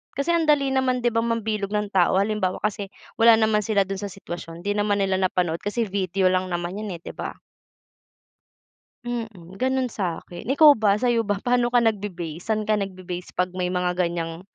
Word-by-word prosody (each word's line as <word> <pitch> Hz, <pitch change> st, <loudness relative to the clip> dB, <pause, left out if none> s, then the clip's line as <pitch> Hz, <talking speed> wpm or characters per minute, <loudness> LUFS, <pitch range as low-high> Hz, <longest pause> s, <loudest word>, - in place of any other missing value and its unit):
Kasi 280 Hz, +5 st, 0 dB
ang 335 Hz, -2 st, +2 dB
dali 280 Hz, -3 st, +3 dB
naman, 255 Hz, -2 st, +1 dB
'di 240 Hz, -, +2 dB
ba, 230 Hz, -, +1 dB
mambilog 220 Hz, -3 st, -1 dB
ng 210 Hz, -1 st, -1 dB
tao. 185 Hz, -2 st, +3 dB
Halimbawa, 200 Hz, -3 st, -1 dB
kasi 210 Hz, -1 st, -2 dB, 0.3 s
wala 230 Hz, 0 st, +8 dB
naman 220 Hz, -1 st, +2 dB
sila 205 Hz, -3 st, +2 dB
do'n 195 Hz, 0 st, -5 dB
sa 205 Hz, -, -4 dB
sitwasyon, 175 Hz, -3 st, -8 dB
'di 205 Hz, -, 0 dB
naman 205 Hz, -1 st, +1 dB
nila 190 Hz, -1 st, 0 dB
napanood 180 Hz, -3 st, 0 dB
kasi 210 Hz, +3 st, -1 dB
video 190 Hz, -2 st, 0 dB
lang 185 Hz, 0 st, 0 dB
naman 175 Hz, +2 st, -3 dB
'yan, 210 Hz, -4 st, -4 dB
eh, 165 Hz, -, -11 dB
'di -, -, -6 dB
ba? -, -, -5 dB, 1.7 s
Mm, 220 Hz, -7 st, -6 dB
gano'n 260 Hz, 0 st, +1 dB
sa'kin. 175 Hz, +1 st, -5 dB
Ikaw 295 Hz, +2 st, +8 dB
ba, 210 Hz, -5 st, +2 dB
sa'yo 240 Hz, 0 st, +2 dB
ba? 205 Hz, -2 st, -1 dB
Pa'no 245 Hz, +3 st, +1 dB
ka 245 Hz, -, +3 dB
nagbe-base? 190 Hz, -7 st, -2 dB
Saan 215 Hz, -1 st, 0 dB
ka 215 Hz, -, +2 dB
nagbe-base 185 Hz, -3 st, -4 dB
'pag 180 Hz, 0 st, 0 dB
may 180 Hz, -1 st, -1 dB
mga 180 Hz, 0 st, 0 dB
ganyang 170 Hz, -2 st, -2 dB
205 Hz, 190 wpm, -24 LUFS, 180-230 Hz, 1.7 s, wala